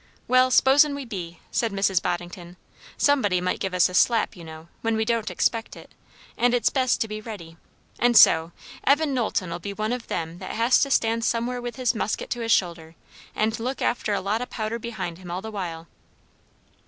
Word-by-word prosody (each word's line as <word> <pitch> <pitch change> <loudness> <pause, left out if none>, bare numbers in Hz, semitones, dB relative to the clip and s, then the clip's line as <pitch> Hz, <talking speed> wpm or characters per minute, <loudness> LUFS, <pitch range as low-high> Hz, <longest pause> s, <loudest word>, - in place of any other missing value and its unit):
"Well, 255 +1 +4
suppos'n 280 +3 +5
we 280 -1 -6
be," 175 -7 -7
said 230 -2 0
Mrs. 195 -2 +1
Boddington; 175 0 -5 0.4
"somebody 230 -11 +2
might 180 +1 -2
give 190 -1 -3
us 180 - +5
a 180 - -9
slap, 230 +5 +2
you 175 - -11
know, 160 0 -11
when 225 0 0
we 220 - 0
don't 230 -1 0
expect 230 -1 -1
it, - - -14 0.4
and 245 +1 +2
it's 245 - +2
best 255 -2 +1
to 225 - +1
be 215 0 -6
ready; 195 -8 -9 0.4
and 240 -1 +4
so, 160 +1 +6 0.3
Evan 290 +1 +2
Knowlton'll 185 -8 -2
be 200 +3 -6
one 215 +3 -2
o' 250 - -2
them 165 -6 -5
that 185 - -6
has 230 +3 +3
to 280 - +1
stand 230 -3 +1
somewhere 240 +2 -1
with 240 0 -6
his 250 -2 0
musket 220 -2 -3
to 240 - -2
his 230 0 -1
shoulder, 170 -4 0 0.4
and 220 +2 0
look 255 +4 -3
after 215 -3 0
a - - -2
lot 205 +4 -1
o' 250 - -4
powder 220 +1 -4
behind 195 -7 -5
him 180 -2 -11
all 180 +2 -4
the 220 - -6
while." 170 -5 -5
220 Hz, 205 wpm, -24 LUFS, 180-240 Hz, 0.4 s, so